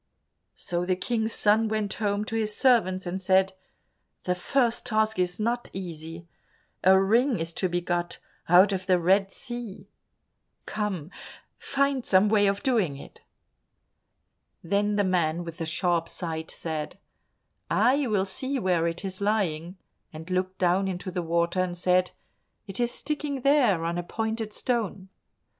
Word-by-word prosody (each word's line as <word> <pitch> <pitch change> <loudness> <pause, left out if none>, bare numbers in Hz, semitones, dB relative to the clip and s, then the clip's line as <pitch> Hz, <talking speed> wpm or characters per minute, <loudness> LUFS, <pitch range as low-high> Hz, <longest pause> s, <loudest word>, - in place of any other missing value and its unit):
So 175 0 -3
the 185 +1 +1
King's 220 +3 -1
son 220 +1 +3
went 215 -2 -1
home 205 -1 -1
to 225 - -4
his 215 -2 -1
servants 190 -8 +3
and 180 +2 -3
said, 190 +1 +3 0.7
"The 180 - +1
first 235 +6 0
task 220 -2 +1
is 180 +1 -1
not 240 +3 -1
easy. 165 -2 -7 0.6
A 190 +1 +6
ring 230 +6 +3
is 165 0 -4
to 185 - 0
be 175 0 -1
got 175 0 -2 0.3
out 185 +4 +6
of 185 -1 -4
the 185 -1 +4
Red 195 +3 +2
Sea. 240 -5 -7 0.7
Come, 195 -6 -3 0.5
find 275 -2 0
some 195 0 +4
way 205 -1 +4
of 200 0 -1
doing 210 - +1
it." - - -13 1.4
Then 205 +4 +1
the 205 - +2
man 175 -3 0
with 165 -1 -8
the 165 - -3
sharp 170 0 0
sight 160 -2 -3
said, 155 -2 -5 0.7
"I 270 +2 +3
will 205 -4 +1
see 260 +8 -2
where 180 -7 +1
it 170 +3 -3
is 190 0 -4
lying," 185 -4 -1 0.3
and 160 +3 -9
looked 185 +1 -1
down 185 +2 +2
into 185 0 -4
the 180 0 -2
water 170 +2 0
and 180 -1 -1
said, 180 0 +2 0.6
"It 195 +1 -6
is 240 0 +1
sticking 295 -2 -3
there, 245 - +3
on 170 +1 -1
a - - -3
pointed 220 +3 -3
stone." 210 -5 -2
190 Hz, 155 wpm, -26 LUFS, 175-220 Hz, 1.4 s, A